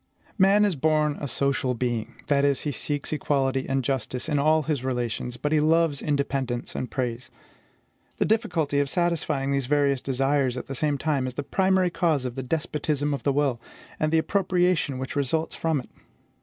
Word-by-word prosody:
Man 200 Hz, +2 st, +5 dB
is 200 Hz, -4 st, +1 dB
born 150 Hz, 0 st, +2 dB
a 145 Hz, -, -2 dB
social 135 Hz, -1 st, 0 dB
being, 120 Hz, -1 st, -2 dB
that 140 Hz, -1 st, +2 dB
is, 140 Hz, -2 st, +2 dB
he 150 Hz, -, -2 dB
seeks 145 Hz, +1 st, -3 dB
equality 135 Hz, -2 st, 0 dB
and 135 Hz, 0 st, +1 dB
justice 125 Hz, -1 st, -2 dB
in 145 Hz, -, +1 dB
all 155 Hz, +2 st, +3 dB
his 145 Hz, -3 st, -2 dB
relations, 125 Hz, -1 st, -2 dB
but 150 Hz, +3 st, -2 dB
he 155 Hz, -, +4 dB
loves 160 Hz, -1 st, +2 dB
independence 135 Hz, -4 st, -1 dB
and 125 Hz, -, -4 dB
praise. 125 Hz, -1 st, -3 dB, 0.9 s
The -, -, +2 dB
difficulty 160 Hz, -10 st, +1 dB
of 140 Hz, -1 st, +1 dB
satisfying 155 Hz, -5 st, 0 dB
these 135 Hz, -2 st, 0 dB
various 140 Hz, -2 st, +2 dB
desires 135 Hz, -1 st, +1 dB
at -, -, -5 dB
the 135 Hz, -, -6 dB
same 145 Hz, +1 st, 0 dB
time 140 Hz, -3 st, 0 dB
is 125 Hz, -, -6 dB
the 145 Hz, -, -3 dB
primary 190 Hz, +1 st, +2 dB
cause 160 Hz, -7 st, +1 dB
of 125 Hz, -, -3 dB
the 130 Hz, -, -4 dB
despotism 150 Hz, +1 st, -1 dB
of 140 Hz, -, -3 dB
the 140 Hz, -, +1 dB
will, 135 Hz, -4 st, 0 dB, 0.4 s
and 155 Hz, 0 st, +1 dB
the 160 Hz, -, +4 dB
appropriation 180 Hz, -5 st, +1 dB
which 130 Hz, 0 st, -5 dB
results 145 Hz, +3 st, 0 dB
from 160 Hz, -3 st, 0 dB
it. 125 Hz, -, -10 dB
140 Hz, 185 wpm, -25 LUFS, 130-155 Hz, 0.9 s, Man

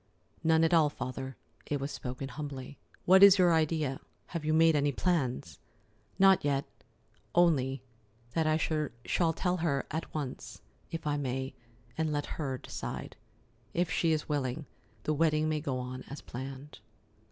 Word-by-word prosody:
"None 160 Hz, 0 st, +4 dB
at 165 Hz, -, +3 dB
all, 160 Hz, -3 st, +5 dB
Father." 130 Hz, -1 st, -6 dB, 0.3 s
It 145 Hz, -, -1 dB
was 140 Hz, +2 st, -3 dB
spoken 130 Hz, +1 st, -5 dB
humbly. 140 Hz, -3 st, -7 dB, 0.3 s
"What 190 Hz, +2 st, +7 dB
is 200 Hz, -1 st, +10 dB
your 180 Hz, -2 st, +5 dB
idea? 155 Hz, -4 st, +1 dB, 0.3 s
Have 170 Hz, -3 st, -2 dB
you 155 Hz, -, 0 dB
made 160 Hz, 0 st, +5 dB
any 145 Hz, 0 st, +2 dB
plans?" 130 Hz, -, -1 dB, 0.6 s
"Not 195 Hz, -1 st, +6 dB
yet—only, 140 Hz, 0 st, -1 dB, 0.5 s
that 160 Hz, -1 st, +1 dB
I 155 Hz, 0 st, +3 dB, 0.5 s
shall 165 Hz, -2 st, +2 dB
tell 180 Hz, +2 st, 0 dB
her 150 Hz, -5 st, 0 dB
at 160 Hz, +2 st, -4 dB
once, 145 Hz, -4 st, -6 dB, 0.3 s
if 165 Hz, -1 st, -5 dB
I 145 Hz, -1 st, +1 dB
may, 130 Hz, -1 st, -2 dB, 0.5 s
and 160 Hz, -1 st, +1 dB
let 145 Hz, -1 st, -1 dB, 0.2 s
her 135 Hz, -3 st, -2 dB
decide. -, -, -6 dB, 0.6 s
If 175 Hz, -1 st, +1 dB
she 165 Hz, -, +2 dB
is 155 Hz, -1 st, 0 dB
willing, 145 Hz, 0 st, -2 dB, 0.4 s
the 155 Hz, -, +1 dB
wedding 155 Hz, 0 st, +2 dB
may 155 Hz, -1 st, 0 dB
go 140 Hz, -4 st, -2 dB
on 125 Hz, 0 st, -5 dB
as 140 Hz, -, -6 dB
planned." 135 Hz, +3 st, -8 dB
150 Hz, 150 wpm, -31 LUFS, 135-165 Hz, 0.6 s, is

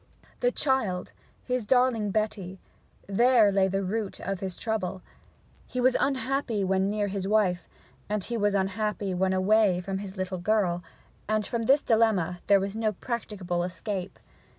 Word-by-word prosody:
The -, -, +2 dB
child, 225 Hz, -, 0 dB, 0.3 s
his 250 Hz, -4 st, -2 dB
darling 245 Hz, -4 st, +3 dB
Betty: 195 Hz, -3 st, -2 dB, 0.5 s
there 230 Hz, +1 st, +4 dB
lay 195 Hz, -1 st, +3 dB
the 195 Hz, +1 st, -1 dB
root 205 Hz, +1 st, -3 dB
of 195 Hz, -1 st, -3 dB
his 190 Hz, -2 st, -5 dB
trouble. 195 Hz, -5 st, -3 dB, 0.6 s
He 255 Hz, -, -4 dB
was 255 Hz, +1 st, +3 dB
unhappy 260 Hz, -5 st, 0 dB
when 190 Hz, +1 st, +1 dB
near 210 Hz, 0 st, 0 dB
his 195 Hz, -1 st, -3 dB
wife, 195 Hz, -4 st, +1 dB, 0.5 s
he 235 Hz, -, -3 dB
was 205 Hz, -2 st, +1 dB
unhappy 200 Hz, 0 st, -1 dB
when 185 Hz, +1 st, +1 dB
away 190 Hz, 0 st, +3 dB
from 190 Hz, +1 st, -4 dB
his 195 Hz, -1 st, -8 dB
little 185 Hz, -1 st, -3 dB
girl; 180 Hz, -2 st, +1 dB, 0.5 s
and 215 Hz, 0 st, +1 dB
from 230 Hz, +1 st, -2 dB
this 275 Hz, +2 st, +5 dB
dilemma 205 Hz, -7 st, +2 dB
there 200 Hz, -1 st, +6 dB
was 195 Hz, +1 st, -3 dB
no 220 Hz, -1 st, 0 dB
practicable 190 Hz, -6 st, -3 dB
escape. 185 Hz, +1 st, -4 dB
200 Hz, 150 wpm, -27 LUFS, 190-225 Hz, 0.6 s, there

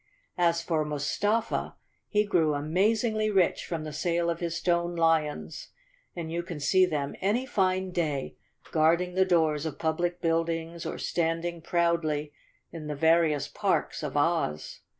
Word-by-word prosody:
As 170 Hz, -1 st, +2 dB
for 160 Hz, -2 st, 0 dB
Mustafa, 150 Hz, +10 st, -1 dB, 0.3 s
he 210 Hz, 0 st, +2 dB
grew 160 Hz, -6 st, +2 dB
amazingly 215 Hz, +8 st, +1 dB
rich 190 Hz, -4 st, +2 dB
from 165 Hz, -3 st, -3 dB
the 155 Hz, -1 st, -6 dB
sale 170 Hz, +2 st, 0 dB
of 170 Hz, -, -4 dB
his 170 Hz, -1 st, -2 dB
stone 170 Hz, 0 st, 0 dB
lions, 165 Hz, -3 st, 0 dB, 0.5 s
and 165 Hz, -2 st, -5 dB
you 170 Hz, +1 st, -1 dB
can 170 Hz, -3 st, -7 dB
see 185 Hz, +5 st, +4 dB
them 145 Hz, -4 st, -2 dB
any 215 Hz, +7 st, +1 dB
fine 185 Hz, -5 st, 0 dB
day, 150 Hz, -6 st, -2 dB, 0.4 s
guarding 170 Hz, +3 st, +2 dB
the 190 Hz, +1 st, +3 dB
doors 160 Hz, -5 st, +2 dB
of 160 Hz, -3 st, -4 dB
public 175 Hz, +2 st, -1 dB
buildings 165 Hz, 0 st, -1 dB
or -, -, -4 dB
standing 165 Hz, 0 st, -1 dB
proudly 160 Hz, -3 st, 0 dB, 0.4 s
in 160 Hz, -2 st, -7 dB
the 150 Hz, -, -3 dB
various 160 Hz, -1 st, +3 dB
parks -, -, -1 dB
of -, -, -3 dB
Oz. 145 Hz, -, 0 dB
170 Hz, 150 wpm, -28 LUFS, 155-180 Hz, 0.5 s, see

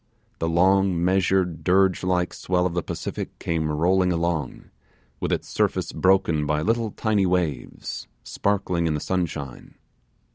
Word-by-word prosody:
The 80 Hz, -, 0 dB
long, 90 Hz, 0 st, +3 dB
measured, 90 Hz, -3 st, +1 dB
dirge 95 Hz, +2 st, +3 dB
like 90 Hz, -1 st, 0 dB, 0.2 s
well 90 Hz, -1 st, +3 dB
of 90 Hz, -, -1 dB
the 85 Hz, -, 0 dB
Pacific -, -, -5 dB
came 80 Hz, -2 st, -1 dB
rolling 90 Hz, +4 st, +2 dB
along, 85 Hz, -5 st, -2 dB, 0.5 s
with -, -, -2 dB
its -, -, -1 dB
surface -, -, 0 dB
broken 90 Hz, -6 st, +2 dB
by 75 Hz, +1 st, 0 dB
little 115 Hz, +2 st, +1 dB
tiny 105 Hz, -2 st, +1 dB
waves, 85 Hz, -9 st, -2 dB, 0.2 s
sparkling 95 Hz, -4 st, -1 dB
in 80 Hz, -, 0 dB
the -, -, -2 dB
sunshine. 80 Hz, -7 st, -4 dB
90 Hz, 140 wpm, -24 LUFS, 80-95 Hz, 0.5 s, long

